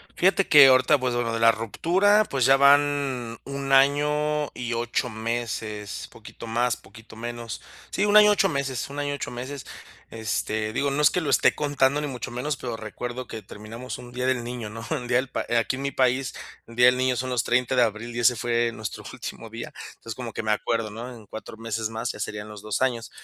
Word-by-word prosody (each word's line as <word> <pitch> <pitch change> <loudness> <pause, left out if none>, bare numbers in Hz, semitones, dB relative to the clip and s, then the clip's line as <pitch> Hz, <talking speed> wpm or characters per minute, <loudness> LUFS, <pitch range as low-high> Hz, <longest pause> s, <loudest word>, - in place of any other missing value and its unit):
Fíjate 195 +1 +3
que, 145 -3 +9
ahorita 130 +2 +5
pues 125 -1 -1
bueno, 115 -1 -1
de 115 - -1
la 115 0 +7
ruptura, 180 - +2
pues 130 -3 +1
ya 135 +1 +7
van 140 -4 +3
1 140 0 -4
año 150 +2 +3
y 120 -1 -4
8 120 +2 -1
meses, 110 -2 -4
poquito - - -11
más, 120 +1 0
poquito 110 +3 -15
menos. 120 -1 -6 0.3
Sí, 195 - -1
un 205 - +2
1 - - +9
año 210 0 +8
8 205 -1 +4
meses, 140 -6 -2
1 145 - -5
año 145 0 -1
8 - - -5
meses, 130 +3 -6 0.5
este, 110 -1 -2
digo, 140 +4 0
no 140 +2 0
es 150 - +7
que - - 0
lo 155 -5 -2
esté - - +4
contando 145 -1 +1
ni 150 - -2
mucho 130 -2 -5
menos, 130 +4 -3
pero 120 -3 -5
recuerdo 120 +3 -6
que 110 - -7
terminamos 105 +5 -8
un 120 0 -11
Día 125 +1 -2
del 125 -2 +1
Niño, 120 -3 -5
¿no? 115 +2 -8
El 125 - -2
día 120 0 +3
del 130 +1 -1
pa - - -3
aquí 115 +3 0
en - - -6
mi 140 - -1
país, 130 -1 +1 0.3
el 115 - -12
Día 125 +1 +6
del 125 0 +6
Niño 130 0 +1
son 130 +1 -3
los 120 -2 +1
30 125 +1 +1
de 125 - +4
abril 115 +1 -1
y - - -2
ese 120 +1 +4
fue 120 0 0
nuestro 110 -4 -6
último - - -7
día. - - -7 0.2
Entonces, 115 - -8
como 120 -1 -6
que - - -5
me 110 - 0
acuerdo, 110 0 -1
¿no? 115 +4 -7
En 115 -3 -12
4 110 +2 -9
meses 115 -1 -3
más, 115 +2 -3
ya - - -11
serían 105 0 -4
los 105 -1 -9
2 110 +5 -1
años. 120 -3 -1
125 Hz, 225 wpm, -25 LUFS, 115-135 Hz, 0.5 s, que